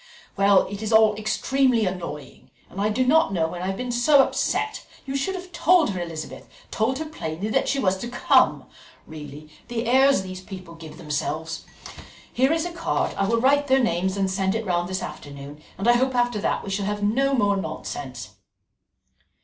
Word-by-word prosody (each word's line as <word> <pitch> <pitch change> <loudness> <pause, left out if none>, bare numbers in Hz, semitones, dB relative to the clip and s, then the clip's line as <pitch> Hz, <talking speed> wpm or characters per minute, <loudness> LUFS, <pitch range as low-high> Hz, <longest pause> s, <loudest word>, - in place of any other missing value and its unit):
"Well, 195 -1 +4
it 200 +1 -7
is 220 0 -3
all 220 -1 +5
extremely 235 +2 +1
annoying, 175 -5 -6 0.2
and 195 - -5
I 210 - +2
do 255 +4 +1
not 320 +2 +4
know 165 -4 0
when 175 +1 -6
I 185 - -3
have 195 0 -2
been 250 -1 -3
so 270 +4 +5
upset. 435 - -1 0.2
You 270 -1 -4
should 380 +8 -1
have 365 0 -8
told 345 - +3
her, 185 -2 -4
Elizabeth, 165 -2 -7 0.2
told 225 +4 0
her 315 - -4
plainly 195 - -5
that - - +1
she 280 - 0
was 190 -8 +1
to 240 - -5
come. 245 0 +3 0.4
Really, 150 -1 -10 0.2
the 235 0 -3
airs 265 -2 +4
these 185 0 -7
people 185 -3 -10
give 165 -2 -11
themselves! 160 +1 -4 0.7
Here 260 +3 +2
is 325 0 0
a 350 - -4
card; 340 -1 -1
I 195 - 0
will 230 +2 +2
write 285 +3 +3
their 265 0 +4
names 190 -4 0
and 195 -1 +1
send 190 +1 0
it 225 0 -2
round 175 -1 -1
this 185 0 -3
afternoon, 140 +1 -9 0.2
and 195 - -2
I 240 - +7
hope 260 +1 +1
after 245 -3 +1
that - - -1
we 195 - -6
shall 195 0 -1
have 205 0 -3
no 270 +7 +2
more 205 -4 +2
nonsense." 140 - -6
205 Hz, 200 wpm, -24 LUFS, 175-260 Hz, 0.7 s, I